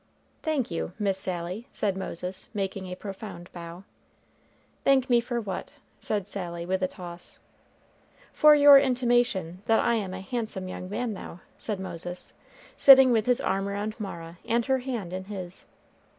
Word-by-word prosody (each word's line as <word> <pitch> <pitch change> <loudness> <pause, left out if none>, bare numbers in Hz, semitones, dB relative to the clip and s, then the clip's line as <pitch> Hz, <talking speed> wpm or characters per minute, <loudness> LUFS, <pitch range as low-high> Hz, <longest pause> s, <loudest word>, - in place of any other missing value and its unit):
"Thank 300 - -1
you, 170 +1 -3
Miss 195 -3 0
Sally!" 185 +4 -4
said 200 -3 -1
Moses, 185 -1 -5
making 195 -1 -3
a 180 - -5
profound 190 -3 -8
bow. 170 +1 -9 1.0
"Thank 265 -2 +3
me 240 -1 +5
for 240 0 -2
what?" 205 -4 -5 0.3
said 205 -3 -2
Sally, 170 -4 -4
with 190 +1 -1
a 185 - +2
toss. 175 -1 -10 1.0
"For 300 -1 +7
your 285 -1 +9
intimation 240 -9 +1
that 225 - +4
I - - +2
am 195 -5 -2
a 190 - -6
handsome 215 -3 -4
young 185 0 -6
man 230 +2 -2
now," 185 -2 -9
said 210 -3 -4
Moses, 175 -1 -5 0.4
sitting 265 -2 +8
with 225 -1 +2
his 250 -1 +3
arm 195 +1 0
around 205 +2 -3
Mara, 170 -4 -7
and 235 0 +1
her 265 -1 +2
hand 235 -9 -4
in 190 0 -4
his. 190 -3 -7
195 Hz, 160 wpm, -27 LUFS, 185-235 Hz, 1.0 s, your